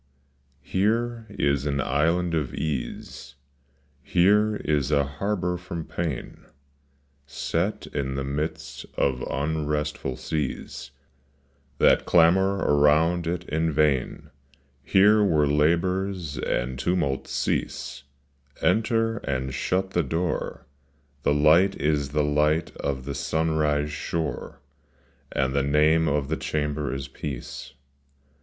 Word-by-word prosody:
MERE 115 +4 0
is 70 -7 0
an 70 -1 -1
island 85 +5 +1
of 75 -5 -1
ease, 65 -6 -5 0.7
Here 105 +6 +3
is 75 -3 +1
a 70 -2 +3
harbor 90 +5 -2
from 85 -2 -6
pain 80 -7 -5 0.8
Set 85 +7 -2
in 65 -2 -3
the 70 - -2
midst 75 +1 -4
of 65 -2 +1
unrestful 75 -2 -2
seas 70 -3 -4 0.9
That - - +4
clamor 95 +3 +4
around 80 +2 +3
it 85 +1 -3
in 80 +1 0
vain. 75 -5 0 0.5
Here 105 +7 +5
where 80 -7 +3
labors 85 +3 +1
and 65 +1 -2
tumnlts 75 -4 0
cease, - - -2 0.6
Enter, 115 0 +1
and 65 - -3
shut 95 +7 -1
the 85 - +2
door; 80 +3 -2 0.6
The 70 - +2
light 80 +7 +5
is 75 -2 +1
the 75 +1 +1
light 75 +2 +1
of 65 -2 -3
the 70 - -3
sunrise 75 -1 0
shore, 80 0 -4 0.7
And 65 0 0
the 70 - +2
name 75 +3 +3
of 70 -2 0
the 80 - -1
chamber 75 -1 -2
is 70 0 -4
peace. 65 -1 -7
75 Hz, 110 wpm, -25 LUFS, 70-90 Hz, 0.9 s, Here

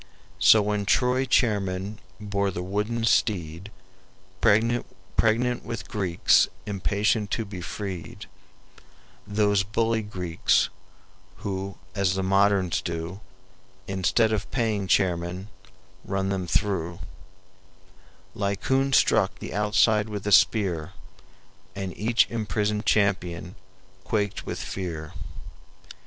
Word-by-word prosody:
So 110 -2 +7
when 105 -1 -1
Troy 125 +3 +2
chairmen 105 -4 0 0.2
bore 100 -1 -1
the 90 -1 -4
wooden 105 +5 -2
steed 90 -5 0 0.7
Pregnant 115 +3 +3 0.8
with 115 -2 -6
Greeks 95 -5 +3 0.2
impatient 105 +1 0
to 115 - -2
be 100 -3 -7
freed, 95 0 -6 1.0
(Those 105 -1 +2
bully 110 +3 0
Greeks, 90 -5 +1 0.8
who, 95 -1 -4 0.2
as 95 -2 +1
the 95 - -1
moderns 95 -1 +2
do, 85 +3 -5 0.7
Instead 100 +4 +2
of 100 -3 -2
paying 110 -6 -1
chairmen, 90 +1 0 0.5
run 95 0 -2
them 95 -2 -2
through); 85 -4 -1 1.3
Laocoon 130 +7 0
struck - - +3
the - - -7
outside 105 +1 +2
with 105 -2 -5
a 105 - 0
spear, 95 -5 +3 0.8
And 95 -2 -5
each 115 +4 +3
imprisoned 105 -1 -2
champion 90 -4 +1 0.5
quaked 105 -2 -2
with - - -3
fear." 80 -5 -5
100 Hz, 100 wpm, -26 LUFS, 95-105 Hz, 1.3 s, So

